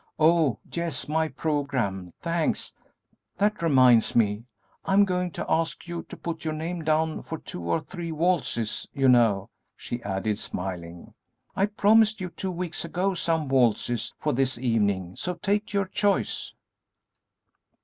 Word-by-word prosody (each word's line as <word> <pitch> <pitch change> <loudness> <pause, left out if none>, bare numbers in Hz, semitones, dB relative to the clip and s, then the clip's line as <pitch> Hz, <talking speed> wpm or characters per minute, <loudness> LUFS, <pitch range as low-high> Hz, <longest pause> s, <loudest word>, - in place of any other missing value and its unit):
Oh, 160 -4 +4 0.2
yes, 170 -5 -2
my 160 +1 +1
programme; 130 - -2
thanks! 170 -2 -1 0.6
That 205 +1 +1
reminds 130 -7 +5
me, 105 0 +2 0.4
I - - -1
am 200 +1 +6
going 180 -1 -1
to - - -4
ask 165 +1 0
you 170 -1 -4
to - - -8
put 165 -1 -5
your 155 -1 -2
name 165 +2 -4
down 155 0 +1
for 160 - -6
two 90 - -8
or 85 - 0
three 170 0 -6
waltzes; 160 -9 0
you 135 -2 +2
know," 115 -6 +4 0.2
she 120 - -5
added, 100 +1 -2
smiling, 90 -4 -6 0.4
"I 195 - +2
promised 215 +1 +4
you 185 -1 -4
two 190 - -4
weeks 175 -1 -4
ago 190 +2 0
some 165 -3 0
waltzes 120 -3 +1
for - - -1
this 130 0 +1
evening, 100 -7 0
so 180 0 -3
take 205 +4 -1
your 200 -1 +1
choice." 200 +1 0
155 Hz, 150 wpm, -26 LUFS, 120-175 Hz, 0.6 s, am